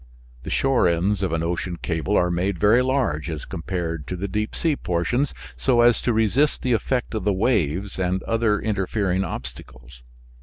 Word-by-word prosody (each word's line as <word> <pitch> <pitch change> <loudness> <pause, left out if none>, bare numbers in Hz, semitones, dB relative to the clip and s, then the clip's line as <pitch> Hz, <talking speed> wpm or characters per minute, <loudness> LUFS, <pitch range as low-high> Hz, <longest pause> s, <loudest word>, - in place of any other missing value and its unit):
The - - -7
shore 135 -7 +2
ends 95 +4 +1
of 95 - 0
an 80 0 -1
ocean 85 +1 -2
cable 85 +6 -1
are 90 0 +2
made 90 +2 -1
very 105 +7 +4
large, 125 - 0
as 75 -4 -5
compared 85 -3 -4
to 90 - -3
the 95 +3 -3
deep 105 +3 -3
sea 160 -3 +1
portions, 120 +9 -1 0.2
so 125 -3 +2
as 120 -1 +4
to 120 - +1
resist 115 +7 +2
the 125 - +2
effect 125 +2 -1
of 110 -3 -2
the 105 - +2
waves 95 - 0
and 95 0 0
other 115 -2 +1
interfering 100 -2 0
obstacles. 65 -4 -8
95 Hz, 180 wpm, -23 LUFS, 85-115 Hz, 0.2 s, very